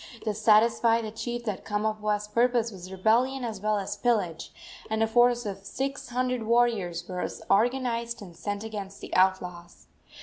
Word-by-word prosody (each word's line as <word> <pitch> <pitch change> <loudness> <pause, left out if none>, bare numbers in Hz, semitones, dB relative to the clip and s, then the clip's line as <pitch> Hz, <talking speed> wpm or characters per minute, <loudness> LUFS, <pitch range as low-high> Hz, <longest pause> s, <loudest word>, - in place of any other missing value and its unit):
This 215 -1 -2
satisfied 225 +1 +4
the 215 - -5
chief 240 +2 -4
that 210 -4 -3
Kamapuaa's 210 0 -1
purpose 235 +1 +2
was 185 -2 -10
rebellion 235 +7 +2
as 215 -4 -5
well 215 0 +1
as 200 +1 -3
pillage, 205 -10 0 0.4
and 220 0 +1
a - - +5
force 240 +1 +3
of 195 -1 -5
six 270 +5 -4
hundred 250 0 -1
warriors 220 -7 +1
was 180 -1 -4
organized 235 +1 +1
and 180 -5 -11
sent 205 +5 -4
against 205 -3 -6
the - - -6
outlaws. 180 -2 0
220 Hz, 160 wpm, -27 LUFS, 195-235 Hz, 0.4 s, a